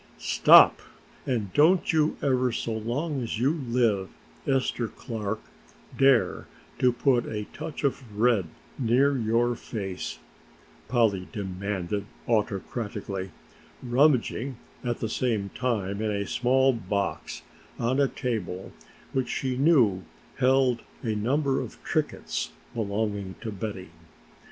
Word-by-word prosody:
"Stop, - - +7 0.5
and 110 -7 -1
don't 165 +5 +4
you 155 -1 +2
ever 130 -2 +2
so 115 0 -3
long 130 +7 -2
as 115 -2 -3
you 130 +5 +3
live, 120 - 0 0.4
Esther 130 -3 +1
Clark, 110 -3 -4 0.6
dare 135 -3 +3 0.3
to 125 - +4
put 120 0 +2
a 105 -1 -3
touch 155 0 -6
of 140 -1 +1 0.2
red 115 -6 +3 0.3
near 135 +3 +3
your 120 0 +1
face," 95 -6 -5 0.7
Polly 110 -7 +2
demanded 100 0 -3 0.2
autocratically, 105 -3 -2 0.5
rummaging 130 -1 +2 0.3
at 120 -2 -2
the 110 - 0
same 110 -3 -1
time 105 -4 -2
in 110 - 0
a 100 -1 -1
small 130 +4 +3
box 100 -6 -3 0.3
on 125 +4 0
a 140 - +4
table 105 -9 -4 0.4
which 130 -2 0
she 130 -2 -1
knew 125 - +4 0.4
held 130 -2 +3 0.2
a 110 - 0
number 135 +6 +1
of - - -8
trinkets - - -2 0.2
belonging 100 -3 -2
to 115 - -4
Betty. 95 -3 -6
115 Hz, 115 wpm, -27 LUFS, 105-130 Hz, 0.7 s, Stop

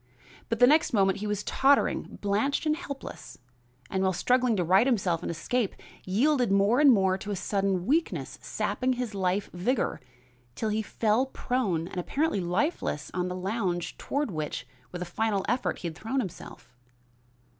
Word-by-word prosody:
But 230 - 0
the 245 - +7
next 300 +2 +4
moment 195 -2 +3
he 210 - -3
was 210 -1 -2
tottering, 275 +1 +2
blanched 210 +10 +1
and 305 0 +2
helpless, 280 -5 -8 0.5
and 190 - -1
while 190 0 +2
struggling 245 +6 +2
to 180 - +1
right 190 +8 +4
himself 190 -9 +1
and - - -4
escape, 205 +7 -1 0.3
yielded 245 +4 +2
more 200 +5 +4
and 290 -2 +7
more 190 -4 +3
to 210 - -7
a 205 - -1
sudden 195 -1 -1
weakness 320 +8 -1
sapping 255 0 -1
his 245 -3 -4
life 195 +1 -1
vigor, 205 +8 -1 0.5
till 220 - -1
he 215 +1 0
fell 220 +4 +1
prone 215 -11 -1
and 185 - -5
apparently 275 - 0
lifeless 180 - -1
on 180 0 -1
the 180 - -4
lounge 185 -2 -2
toward 285 -4 -2
which, 155 -3 -4 0.3
with 180 0 -4
a - - -6
final 200 +2 -1
effort, 245 +3 0
he 175 - -5
had 160 - -6
thrown 225 +9 -2
himself. 170 - -7
205 Hz, 170 wpm, -28 LUFS, 185-250 Hz, 0.5 s, the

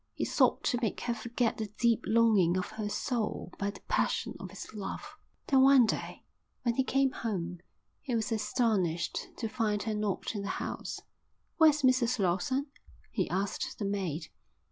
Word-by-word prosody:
He - - -1
sought - - +3
to 245 -4 +1
make 220 - -1
her 240 - 0
forget 235 +1 -1
the 215 - -2
deep 235 -2 +2
longing 215 -6 +4
of 185 - -3
her 215 -1 -3
soul 220 -5 -2
by 200 - 0
the 205 - -9
passion - - 0
of - - -7
his - - -9
love. 205 -2 -6 0.3
Then 270 -1 +4
one 265 -2 +7
day, 220 - -3 0.4
when 235 -2 +2
he 265 - +2
came 270 0 +2
home, 180 -8 -3 0.4
he 255 -4 -2
was 225 0 -1
astonished 210 -6 0
to 225 - -2
find 215 -3 0
her 220 0 -1
not 210 -1 -2
in 205 - -3
the 200 - -4
house. - - -4 0.6
"Where's 305 -3 +5
Mrs 255 -1 +3
Lawson?" 200 +9 +1 0.5
he - - -1
asked 195 +3 -2
the 205 - -3
maid. 180 -6 -2
220 Hz, 170 wpm, -31 LUFS, 200-245 Hz, 0.6 s, one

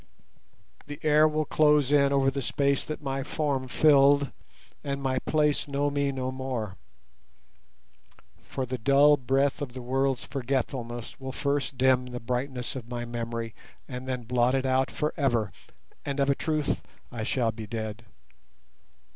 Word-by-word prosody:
The 145 0 -7
air 155 0 +5
will 155 0 0
close 150 -2 +3
in 140 -1 +4
over 135 -1 +3
the 140 0 -3
space 140 +2 +1
that 155 0 -6
my 135 -1 -2
form 135 -2 -1
filled 140 0 +5 0.5
and 140 -1 -2
my 130 -1 0
place 150 -1 +2
know 145 0 0
me 140 -1 0
no 130 -1 -3
more; 130 -7 -4 1.7
for 130 - -4
the 130 0 -4
dull 140 +5 +6
breath 135 +2 +1
of 130 -4 -4
the 130 - -7
world's 135 0 0
forgetfulness 125 -3 -3
will 130 0 -5
first 140 -1 -1
dim 130 0 +3
the 125 -1 -6
brightness 125 +2 -3
of 120 -3 -7
my 120 -1 -4
memory, 115 -1 -4 0.3
and 125 0 -7
then 125 -2 -2
blot 125 +2 +2
it 135 0 0
out 130 0 +2
for 150 - -2
ever, 120 -8 +1 0.5
and 140 0 -3
of 140 0 +3
a - - +4
truth 155 -1 -1 0.3
I 120 -3 -5
shall 115 +1 +1
be 110 0 -8
dead. 110 +1 -5
135 Hz, 155 wpm, -27 LUFS, 125-140 Hz, 1.7 s, dull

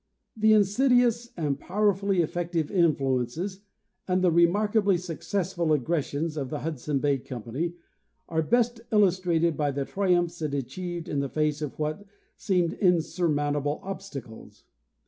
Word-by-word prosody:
The 220 0 +4
insidious 240 +3 +3
and 150 -4 -1
powerfully 200 -1 +1
effective 170 -1 -2
influ 140 -8 +2
ences 180 +11 -4 0.5
and 185 0 +1
the 180 - +4
remarkably 200 +4 +3
successful 175 0 -2
aggressions 155 +2 -1
of 135 -3 -3
the 150 - -4
Hudson 150 -2 -2
Bay 140 0 +1
company 130 +8 -4 0.5
are 160 -1 0
best 235 +6 +1
illustrated 180 -5 +3
by 145 -1 0
the 140 0 -2
triumphs 175 -3 0
it 150 -2 -1
achieved 175 +5 -4
in 145 - -1
the 140 -1 -2
face 150 0 0
of 150 -3 -5
what 155 +5 -3 0.3
seemed 180 -4 0
insurmountable 150 -5 +1
obstacles. 185 - -8
170 Hz, 130 wpm, -27 LUFS, 150-195 Hz, 0.5 s, The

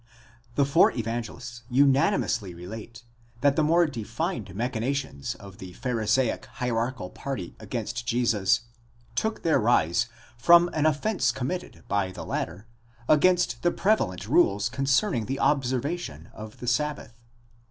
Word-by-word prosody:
The 140 - +3
four 140 - +5
Evangelists 120 +1 -5
unanimously 130 - +2
relate, 110 +6 -9 0.4
that 140 0 +4
the 155 - +3
more 170 +3 +4
defined 115 - -4
machina 120 +3 -1
tions 130 - -4
of 100 -1 -13
the 90 -1 -9
Pharisaic 115 +1 0
hierarchical 120 -4 -2
party 130 -11 -5
against 115 +1 -4
Jesus, 115 -5 +2 0.5
took 220 - -2
their 160 -4 +3
rise 115 -2 +2 0.3
from 170 +7 +6
an 155 0 +2
offence 155 - +1
committed 135 +9 -5
by 100 -4 0
the - - -8
latter 90 +6 -4 0.4
against 155 -6 +3
the 175 - +3
prevalent 180 - 0
rules 100 +4 +3
concerning 135 - +1
the 135 +2 -2
observation 130 - -1
of 110 0 -10
the 125 - -8
sabbath. 145 0 -1
120 Hz, 130 wpm, -26 LUFS, 110-145 Hz, 0.5 s, from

